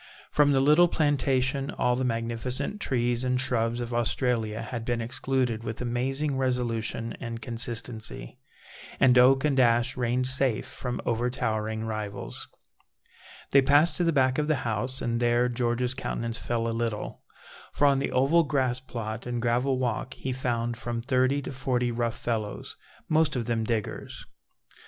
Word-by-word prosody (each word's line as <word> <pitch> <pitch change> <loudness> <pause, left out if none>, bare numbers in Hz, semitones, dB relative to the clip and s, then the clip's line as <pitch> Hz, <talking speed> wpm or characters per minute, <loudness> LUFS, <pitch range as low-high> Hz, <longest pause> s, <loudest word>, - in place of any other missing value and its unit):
From 145 -1 +4
the 135 - +4
little 150 +5 +6
plantation, 140 -3 +1
all 125 0 +1
the 130 - -1
magnificent 125 - -2
trees 120 -1 0
and 125 0 +1
shrubs 120 -2 +2
of 120 0 -4
Australia 115 -2 0
had 115 0 -5
been 120 0 -1
excluded 125 -1 -1
with 110 -1 -5
amazing 135 +4 -1
resolution 115 -3 -1
and 115 -2 -5
consistency, 115 - -4 0.6
and 125 -1 +5
oak 135 +3 +5
and 140 -3 +2
ash 120 0 +3
reigned 125 0 0
safe 130 -3 +1
from 125 -1 -5
overtowering 110 -2 -1
rivals. 110 -2 -5 1.0
They 140 - +7
passed 145 +5 +4
to 175 - +1
the 165 - +3
back 130 -2 +2
of 150 - 0
the 155 - +3
house, 120 +4 -1
and 115 0 0
there 120 0 +3
George's 120 0 0
countenance 115 -3 -3
fell 115 -1 -1
a 115 - -1
little, 115 -2 -3 0.5
for 145 - +1
on 140 -1 +4
the 140 - -2
oval 140 +7 +4
grass 130 -5 0
plot 115 -2 -6
and 120 -1 -2
gravel 125 +3 +1
walk 125 +1 -2
he 130 - -4
found 120 -2 -2
from 120 -1 -4
thirty 130 +2 +1
to - - -5
forty 125 -2 -1
rough 115 -1 -2
fellows, 110 -4 -3 0.3
most 155 -2 +2
of 120 -2 -1
them 115 -2 0
diggers. 110 -2 -3
125 Hz, 155 wpm, -27 LUFS, 115-130 Hz, 1.0 s, They